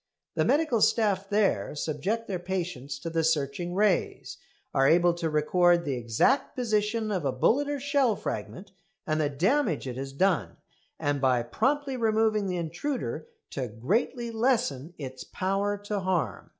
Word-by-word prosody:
The - - +1
medical 290 -7 +2
staff 200 -3 +2
there 205 -6 +1
subject 165 +10 -2
their 185 -3 -3
patients 175 -7 -4
to 165 - -4
the 165 0 +1
searching 160 +2 0
rays, 200 -2 0 0.3
are 135 0 +4
able 175 +1 +4
to 170 -1 -2
record 170 +3 +3
the 140 - -1
exact 120 - +1
position 220 -2 0
of 185 -5 -1
a 135 - +1
bullet 245 - +2
or 290 -1 -2
shell 275 -4 +2
fragment, 190 0 -6 0.3
and 155 0 0
the 145 - +1
damage 185 - +1
it 125 -1 -5
has 135 +1 -5
done; 140 - 0 0.4
and 145 -1 -1
by 125 -3 +3
promptly 265 - 0
removing 220 -2 +2
the 180 -1 -2
intruder 175 - -3 0.2
to 130 -3 -3
greatly 215 - -1
lessen 225 - 0
its 130 -3 -7
power 195 +2 -1
to 205 0 -3
harm. 175 - -2
185 Hz, 155 wpm, -27 LUFS, 145-220 Hz, 0.4 s, are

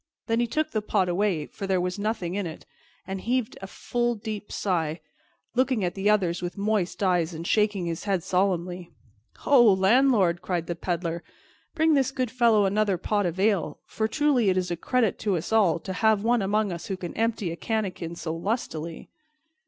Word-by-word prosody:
Then 230 0 0
he 240 - +1
took 310 +6 -1
the 215 - -1
pot 205 -3 +1
away, 175 -4 0
for 195 - -7
there 190 -1 +2
was 180 +3 -2
nothing 200 -5 -2
in 200 -2 -2
it, 160 - -9 0.4
and 190 0 -5
heaved 245 0 -1
a 190 - -6
full 240 +4 -1
deep 215 -1 -6
sigh, 165 -4 -1 0.5
looking 255 -3 +1
at 175 -1 -1
the 195 +2 0
others 185 -5 +2
with 175 +3 -5
moist 205 -2 -1
eyes 175 -3 +1
and 165 +1 -6
shaking 210 -2 +1
his 165 +2 -4
head 195 -4 0
solemnly. 180 -2 -1 0.5
"Ho, 275 -3 +5
landlord!" 190 -3 +3
cried 175 -3 -2
the 175 - -3
Peddler, 170 -1 -3 0.5
"bring 320 -1 +3
this 270 -3 +3
good 255 -4 -2
fellow 230 -4 +4
another 200 -1 +1
pot 205 +2 0
of 175 +2 -4
ale, 200 -3 +1
for 220 - -2
truly 270 -4 +2
it 185 - +1
is 180 -1 -1
a - - 0
credit 230 +4 0
to 200 -4 0
us 165 - -4
all 195 -8 +4
to 190 +3 -6
have 215 +1 +2
one 235 0 +2
among 205 +1 +1
us 170 -1 -6
who 190 - -3
can 175 -2 -6
empty 220 -5 -1
a - - -4
canakin 185 -5 -3
so 160 -1 -4
lustily." 165 -4 -4
195 Hz, 195 wpm, -26 LUFS, 175-220 Hz, 0.5 s, Ho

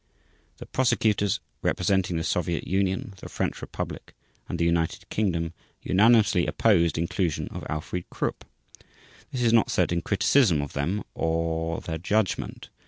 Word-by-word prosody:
The - - -9
Prosecutors 110 -6 +1 0.2
representing 90 -2 +1
the 80 - -1
Soviet 85 0 -1
Union, 95 +1 -1
the - - -9
French - - -2
Republic, - - -6 0.3
and 85 - -2
the 85 - +1
United 85 -1 0
Kingdom 85 -6 0 0.3
unanimously 105 -2 +4
opposed 85 -8 +3
inclusion 85 0 -1
of - - -7
Alfried 75 +3 -4
Krupp. - - -3 0.9
This 125 -2 -2
is 115 -1 +3
not 115 - +4
said 90 - +1
in 85 -1 0
criticism 105 - +3
of 70 0 -4
them 85 +9 -1
or 80 0 -1
their 80 -1 -4
judgment. 100 +2 -1
90 Hz, 140 wpm, -26 LUFS, 80-100 Hz, 0.9 s, unanimously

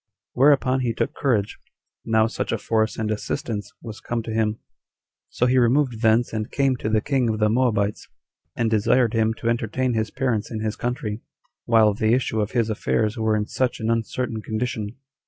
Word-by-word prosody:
Whereupon 135 -1 +4
he 120 -3 0
took - - -1
courage, 110 -7 0 0.4
now 110 -1 +3
such 115 - -3
a 115 - 0
force 110 +1 0
and 110 -1 -1
assistance 110 -1 -3
was 110 -2 -8
come 120 -1 -3
to 110 - -5
him; 110 -1 0 0.7
so 125 - 0
he 130 +1 +3
removed 125 -1 +2
thence 115 +1 +3
and 110 -1 -3
came 135 -2 +1
to 110 - -3
the 110 -1 +2
king 130 -3 0
of 110 - -1
the 105 0 +2
Moabites, 110 -3 0 0.5
and 120 - 0
desired 115 +2 +3
him 110 -1 +1
to 115 - -5
entertain 120 +2 0
his 110 -1 -1
parents 115 -5 -1
in 110 -2 -4
his 110 -1 -2
country, 120 -3 -3 0.4
while 110 -2 +4
the 110 +3 +2
issue 115 -4 -1
of 105 - -3
his 120 -3 +2
affairs 110 0 0
were 110 -2 +1
in 105 -1 0
such 125 +3 -1
an 115 0 0
uncertain 115 0 -2
condition. 110 -1 -3
115 Hz, 190 wpm, -23 LUFS, 110-125 Hz, 0.7 s, Whereupon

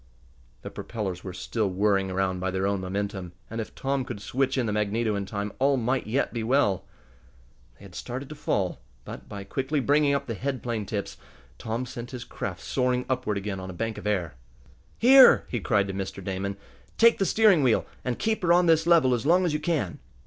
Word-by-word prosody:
The - - -7
propellers 95 -6 -5
were 95 - -5
still 100 +3 -2
whirring 95 0 +1
around 95 0 -1
by 95 +1 -1
their 95 +1 -1
own 100 -1 0
momentum, 95 -1 -4 0.2
and 115 0 -3
if 110 - -9
Tom 135 0 -1
could 120 -4 -6
switch 130 +6 -1
in 125 - +1
the 110 - -1
magneto 105 +1 0
in 100 -1 -3
time 100 0 -4
all 135 +1 +3
might 125 0 -1
yet 130 +6 0
be 115 - -2
well. 115 -6 +2 0.9
They 100 - -14
had 95 - -13
started 130 +8 -6
to - - -6
fall, 100 - -1 0.3
but, - - -9
by 100 -1 -6
quickly 135 +8 -2
bringing 145 +1 +3
up 140 0 -2
the 115 - -4
head 130 +3 -3
plane 115 -4 -3
tips, 100 -3 -4 0.4
Tom 115 +3 -3
sent 120 -1 -7
his 125 -2 -6
craft 90 -7 -6
soaring 125 -1 0
upward 125 -5 -1
again 100 -1 -4
on 95 0 -7
a - - -6
bank 115 +4 -3
of - - -6
air. 90 -8 -1 0.6
"Here!" 260 +2 +8
he 120 - -2
cried 100 0 +2
to 95 - -4
Mr. 95 0 -5
Damon. 100 +1 -3 0.4
"Take 230 0 +5
the 195 - +2
steering 215 -7 +5
wheel 125 -5 +2 0.2
and 125 -2 -2
kept 220 0 -1
her 175 -2 +2
on 175 +1 +5
this 165 0 +3
level 160 -7 +5
as 120 +3 -1
long 180 +3 +4
as 165 - 0
you 150 - 0
can." 155 - -1
115 Hz, 215 wpm, -26 LUFS, 100-135 Hz, 0.9 s, Here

